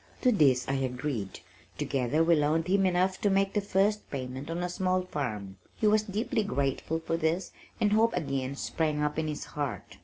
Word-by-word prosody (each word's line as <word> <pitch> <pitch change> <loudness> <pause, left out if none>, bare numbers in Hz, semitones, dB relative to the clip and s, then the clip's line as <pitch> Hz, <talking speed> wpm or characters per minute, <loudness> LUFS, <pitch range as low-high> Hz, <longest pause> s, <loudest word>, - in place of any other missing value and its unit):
To 250 - +4
this 135 - +3
I 135 - 0
agreed. 125 -5 -3 0.4
Together 140 +1 +1
we 170 0 +5
loaned 155 +2 +2
him 195 +1 +3
enough 185 +1 +1
to 205 - +3
make 195 0 +2
the 210 - +1
first 200 +2 +1
payment 130 +1 -5
on 170 +2 -2
a - - 0
small 185 +1 0
farm. 105 - -4 0.2
He - - -2
was 215 0 +5
deeply 215 +3 -1
grateful 145 -3 -1
for 165 0 -2
this 165 +3 0 0.3
and 210 -1 +2
hope 225 0 +3
again 135 -5 -2
sprang 150 0 -1
up 150 +1 0
in 160 - -1
his 150 -1 -4
heart. 145 -4 -4
160 Hz, 190 wpm, -29 LUFS, 140-195 Hz, 0.4 s, we